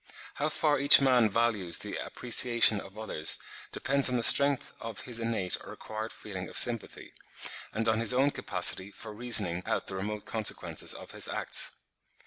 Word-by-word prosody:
How 150 +2 -3
far 150 -1 0
each 140 +1 +8
man 125 -5 +2
values 105 -6 0
the - - -5
appreciation 120 -3 +3
of 95 +2 -14
others, 110 -8 -1 0.3
depends 140 -1 +2
on 125 - -1
the 120 - -2
strength 140 +3 +5
of 115 -2 -8
his 120 -2 -4
innate 115 -5 -1
or - - -11
acquired 110 +1 -8
feeling 95 -3 -9
of - - -6
sympathy; 115 -2 +1 0.6
and 110 +2 -3
on 110 0 +1
his 115 0 +2
own 135 +3 +1
capacity 95 -7 -1
for 105 - -11
reasoning 105 -6 0
out - - -2
the 95 - -7
remote 105 +2 -6
consequences 110 -2 -3
of - - -11
his - - -1
acts. - - 0
115 Hz, 170 wpm, -28 LUFS, 105-125 Hz, 0.6 s, each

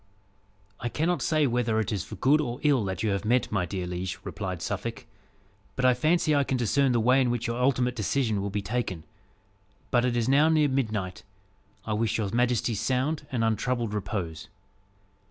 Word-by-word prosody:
"I 120 - -3
cannot 170 +7 0
say 155 -2 +2
whether 120 -3 +1
it 110 - -1
is 100 -5 -2
for - - -9
good 150 +3 +3
or 125 -3 -4
ill 140 -6 +3
that 95 +1 -3
you 110 - +1
have 100 0 -1
met, 120 +3 +1
my 95 -4 0
dear 90 0 -3
liege," 90 +1 -4
replied 95 -4 -5
Suffolk, 115 +5 -4 0.7
"but 130 - 0
I 130 - +6
fancy 155 +5 +2
I 145 -1 +3
can 130 -1 -1
discern 130 +3 +2
the 120 - +2
way 125 +4 +4
in 125 - +2
which 120 -1 -1
your 120 +1 -2
ultimate 125 -1 +2
decision 110 -1 0
will 100 - -2
be 100 0 -3
taken. 100 -6 -3 0.9
But 120 -1 +3
it 125 -1 +1
is 115 -1 0
now 145 +4 +5
near 155 -2 +3
midnight. 110 -9 -2 0.6
I 110 - -2
wish 110 +1 0
your 100 -3 -2
majesty 120 -1 +1
sound 135 +7 -1
and 120 -3 0
untroubled 115 0 0
repose." 95 -6 -4
120 Hz, 190 wpm, -27 LUFS, 105-130 Hz, 0.9 s, I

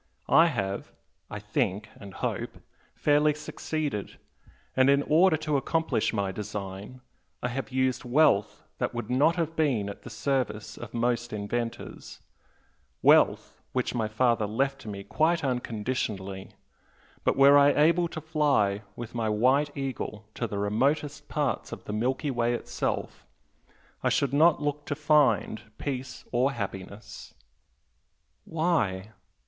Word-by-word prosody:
I 165 +1 +7
have 100 -9 -3 0.4
I - - -5
think 105 0 -2
and 100 -2 -11
hope - - -3 0.4
fairly 150 0 +3
succeeded, 150 -6 -4 0.6
and 130 +1 +5
in 140 0 +4
order 160 +2 +4
to 155 -2 0
accomplish 160 -3 0
my 100 -3 -1
design 100 +4 -6 0.4
I 125 - 0
have 125 -2 -4
used 130 0 0
wealth 125 -5 +2 0.2
that - - -2
would 120 0 -4
not 145 +6 +4
have 165 -2 -2
been 125 -10 +1
at 100 - -8
the - - -10
service 110 -3 -2
of 120 0 -9
most 120 0 0
inventors, 115 +3 -5 0.8
wealth - - +4
which 125 -1 -1
my 115 -3 0
father 110 0 +1
left 135 +5 -1
to - - -12
me 100 -1 -6
quite 160 +7 +1
unconditionally, 110 -6 -3 0.7
but - - +1
were 140 +1 +7
I 145 0 +7
able 170 +4 +3
to 160 - -6
fly 145 -11 +1
with 120 -2 -7
my 115 -2 -1
'White 130 +7 +3
Eagle' 125 -6 -4
to 115 - -3
the 105 - -5
remotest 135 +8 0
parts 145 -4 -1
of - - -7
the 105 - -6
Milky 130 +6 0
Way 120 -1 +1
itself, - - -4 0.7
I - - +2
should 140 -2 +1
not 155 +2 +4
look 145 0 -2
to 145 - -1
find 145 -8 +2 0.2
peace 130 -2 -5
or 130 +3 +2
happiness!" 100 -1 -7 1.1
"Why?" 110 - 0
125 Hz, 140 wpm, -27 LUFS, 105-145 Hz, 1.1 s, I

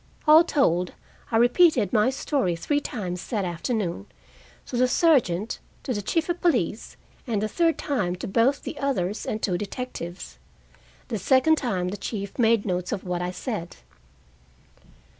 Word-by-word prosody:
All 310 +2 +9
told, 180 - +1 0.4
I 225 - +3
repeated 245 - +4
my 215 +3 +4
story 265 - -1
three 290 - 0
times 185 -10 -5
that 210 -5 -1
afternoon, 175 - -3 0.6
to - - -6
the 250 +1 +3
sergeant, 240 - +2 0.2
to 255 - -2
the 205 - -2
chief 320 - 0
of 345 0 -2
police, 235 - 0 0.3
and 220 -4 0
the 215 - 0
third 330 +8 +1
time 205 -12 -1
to 180 - -6
both 235 +8 +2
the 300 - -6
others 215 -8 -1
and 215 - -2
two 180 -3 0
detectives. 200 -5 -6 0.7
The 225 -4 -2
second 265 - +4
time 185 -9 -1
the 200 - -5
chief 200 +2 -5
made 225 -2 +3
notes 180 -2 -2
of 200 - -3
what 180 -1 -2
I 180 - -2
said. 180 -2 -5
220 Hz, 160 wpm, -25 LUFS, 180-270 Hz, 0.7 s, All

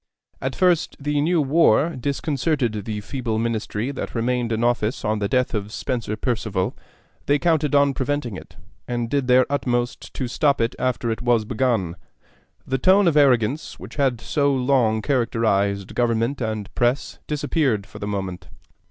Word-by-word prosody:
At - - -2
first 180 -3 +2
the 145 0 0
new 170 +3 +2
war 155 +1 +4
disconcerted 135 - -1
the 105 -2 -4
feeble 120 -1 -3
Ministry 115 +1 -2
that 140 - -6
remained 120 0 0
in 110 +1 0
office 120 -1 0
on 105 0 0
the 100 - 0
death 125 +3 +1
of 105 -1 -3
Spencer 115 -3 -3
Perceval: 110 -5 -2 0.5
they 145 - +4
counted 155 -2 +1
on 140 -1 +4
preventing 135 -4 -2
it, - - -11 0.3
and 120 -1 -2
did 140 -3 0
their 125 0 +5
utmost 120 -3 -2
to 130 - -2
stop 140 +3 +1
it 115 0 +1
after 125 -2 0
it 110 - -3
was 120 -3 +2
begun. 110 -7 0 0.7
The 135 0 -1
tone 190 +5 +5
of 165 - +3
arrogance 135 -1 +2
which - - -11
had 135 -5 +1
so 140 +3 +1
long 125 -5 +2
characterized 110 -7 0
government 120 +3 0
and 110 -3 -3
press 120 +3 0
disappeared 145 -8 0
for - - -12
the 100 - -4
moment. 95 -3 -4
125 Hz, 160 wpm, -22 LUFS, 110-140 Hz, 0.7 s, their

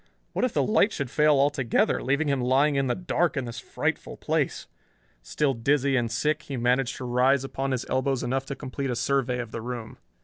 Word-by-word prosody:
What - - -1
if 255 - +2
the - - +2
light 215 0 +3
should 140 -8 -4
fail 150 -1 +4
altogether, 140 -3 +2
leaving 140 +4 0
him 140 -2 +1
lying 135 +4 +3
in 135 -1 +1
the 125 - 0
dark 175 -3 0
in 135 - -1
this 115 -1 -6
frightful - - -3
place! - - -1 0.6
Still 140 - 0
dizzy 135 +3 +1
and 120 -3 0
sick, 150 +7 0
he 135 - -6
managed 125 +2 +1
to 130 - -6
rise 125 +2 +3
upon 135 0 -3
his 130 -2 -2
elbows 130 0 0
enough 130 +2 -1
to 140 - -4
complete 135 0 -4
a 125 - -1
survey 130 -1 0
of 120 -2 -5
the 115 - -5
room. 120 -1 -6
135 Hz, 210 wpm, -26 LUFS, 125-140 Hz, 0.6 s, fail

